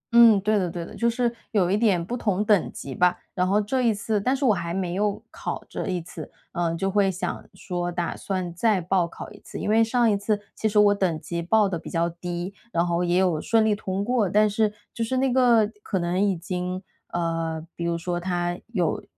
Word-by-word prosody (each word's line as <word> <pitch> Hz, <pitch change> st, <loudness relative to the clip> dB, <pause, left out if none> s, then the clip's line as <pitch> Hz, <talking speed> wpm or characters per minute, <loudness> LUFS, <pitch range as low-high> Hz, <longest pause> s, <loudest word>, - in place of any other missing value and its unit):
嗯， 230 Hz, -3 st, +8 dB
对 215 Hz, +1 st, +2 dB
的 180 Hz, -, -1 dB
对 170 Hz, 0 st, -5 dB
的， -, -, -11 dB
就 235 Hz, 0 st, +2 dB
是 240 Hz, 0 st, 0 dB, 0.2 s
有 185 Hz, -3 st, +2 dB
一 -, -, +3 dB
点 205 Hz, -6 st, +2 dB
不 240 Hz, -, -3 dB
同 210 Hz, -4 st, 0 dB
等 205 Hz, -5 st, +3 dB
级 135 Hz, -, -7 dB
吧。 180 Hz, +3 st, +3 dB, 0.2 s
然 180 Hz, 0 st, +1 dB
后 200 Hz, +3 st, +3 dB
这 255 Hz, +5 st, 0 dB
一 235 Hz, -, +3 dB
次 210 Hz, 0 st, -1 dB
但 255 Hz, +6 st, +1 dB
是 275 Hz, -, -1 dB
我 220 Hz, -, +5 dB
还 170 Hz, -2 st, -3 dB
没 180 Hz, -1 st, -2 dB
有 205 Hz, +1 st, 0 dB
考 -, -, -5 dB
这 -, -, -5 dB
一 180 Hz, -1 st, -1 dB
次， 180 Hz, -, -9 dB, 0.2 s
嗯， 170 Hz, -2 st, -1 dB
就 195 Hz, +3 st, 0 dB
会 200 Hz, -1 st, +3 dB
想 185 Hz, 0 st, -3 dB
说 175 Hz, -2 st, -3 dB
打 175 Hz, -1 st, -2 dB
算 185 Hz, -3 st, -3 dB
再 210 Hz, +2 st, +2 dB
报 180 Hz, 0 st, +1 dB
考 170 Hz, -, -9 dB
一 205 Hz, -, -13 dB
次， -, -, -9 dB
因 -, -, -2 dB
为 225 Hz, +1 st, +5 dB
上 235 Hz, 0 st, +2 dB
一 205 Hz, -, +3 dB
次 205 Hz, +1 st, 0 dB, 0.2 s
其 220 Hz, -, 0 dB
实 210 Hz, -, -1 dB
我 205 Hz, -1 st, +6 dB
等 180 Hz, -6 st, 0 dB
级 170 Hz, +2 st, -4 dB
报 210 Hz, +5 st, +3 dB
得 175 Hz, -4 st, -3 dB
比 -, -, -9 dB
较 170 Hz, 0 st, +1 dB
低， 175 Hz, +2 st, -5 dB, 0.2 s
然 170 Hz, +1 st, +1 dB
后 170 Hz, 0 st, 0 dB
也 175 Hz, 0 st, +2 dB
有 180 Hz, -5 st, +2 dB
顺 225 Hz, -1 st, +3 dB
利 215 Hz, -, +3 dB
通 200 Hz, 0 st, -3 dB
过， 240 Hz, -5 st, +1 dB
但 210 Hz, +3 st, +4 dB
是 210 Hz, 0 st, +1 dB, 0.2 s
就 230 Hz, -, -2 dB
是 255 Hz, +3 st, -1 dB
那 260 Hz, -1 st, +2 dB
个 240 Hz, -4 st, +5 dB
可 195 Hz, -, -2 dB
能 180 Hz, +2 st, 0 dB
已 200 Hz, -2 st, +2 dB
经 180 Hz, +1 st, -4 dB, 0.3 s
呃， 165 Hz, -1 st, -2 dB
比 170 Hz, -, -5 dB
如 170 Hz, 0 st, 0 dB
说 175 Hz, +1 st, -2 dB
它 175 Hz, 0 st, -2 dB
有 190 Hz, -8 st, -1 dB
190 Hz, 255 characters per minute, -25 LUFS, 175-215 Hz, 0.3 s, 嗯